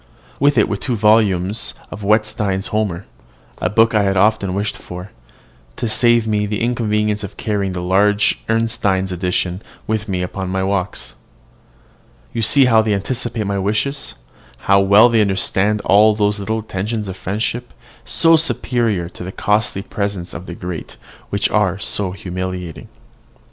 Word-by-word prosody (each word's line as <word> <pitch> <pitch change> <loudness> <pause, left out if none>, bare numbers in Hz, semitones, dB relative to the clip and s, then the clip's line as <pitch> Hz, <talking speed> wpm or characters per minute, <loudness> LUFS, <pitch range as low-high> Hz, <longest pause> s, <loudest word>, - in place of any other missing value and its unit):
With 145 0 +3
it 110 - +4
were 100 - -2
two 125 +3 -2
volumes 105 -2 +2
in - - -23
duodecimo - - -31
of 105 - -8
Wetstein's 105 -2 +1
"Homer," 100 -4 -2 0.5
a 90 - 0
book 115 +4 +3
I 105 - +3
had 95 -1 +1
often 100 -2 +2
wished 100 +1 -2
for, 90 +2 -9 0.6
to 120 - -3
save 120 +1 +3
me 105 -1 0
the 105 0 -3
inconvenience 105 -3 0
of 100 - -8
carrying 100 -3 -1
the 90 -1 -4
large 100 +3 +2
Ernestine 110 -4 +1
edition 90 +1 -1 0.2
with 110 -1 -2
me 90 -2 -1
upon 95 +1 -4
my 95 0 -1
walks. 95 -1 -2 1.2
You 115 - -2
see 135 +4 +5
how 115 -3 +5
they 110 -2 +1
anticipate 115 +1 -3
my 100 0 -1
wishes, 105 +8 -2 0.5
how 100 0 +5
well 100 +4 +6
they 115 -2 +3
understand 100 +1 +1
all 105 +2 +5
those 105 0 +1
little 110 +3 -2
attentions 105 0 -3
of 95 - -5
friendship, 110 +6 -3 0.3
so 165 0 +4
superior 120 - 0
to 90 - -10
the 95 - -6
costly 105 -1 0
presents 100 -5 -4
of 85 +3 -8
the 85 - -6
great, 90 -3 -7 0.3
which 100 0 0
are 105 -4 +2
humiliating. 95 -3 -4
105 Hz, 160 wpm, -18 LUFS, 95-110 Hz, 1.2 s, well